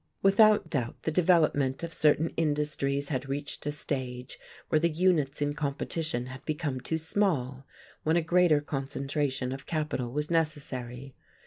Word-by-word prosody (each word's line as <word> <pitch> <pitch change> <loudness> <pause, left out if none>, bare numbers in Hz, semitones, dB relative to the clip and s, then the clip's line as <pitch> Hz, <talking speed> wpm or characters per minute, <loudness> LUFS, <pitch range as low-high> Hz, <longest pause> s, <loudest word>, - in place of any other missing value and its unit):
Without 210 +2 +5
doubt 125 -6 -2
the 160 - 0
development 155 -5 +3
of 165 -1 -4
certain 155 +1 +3
industries 145 -2 -1
had 135 -2 -3
reached 145 +1 -4
a - - +1
stage 130 -3 -4 0.3
where 155 - +3
the 170 +2 +2
units 155 -4 +1
in 145 0 0
competition 145 -1 -2
had 130 +1 -9
become 150 -4 -2
too 160 - -1
small, 155 -7 -1 0.3
when 160 +2 +2
a - - +3
greater 170 -2 +4
concentration 135 -1 -2
of 135 0 -7
capital 150 -6 -2
was 150 +4 -2
necessary. 135 -5 -2
145 Hz, 145 wpm, -29 LUFS, 135-160 Hz, 0.3 s, Without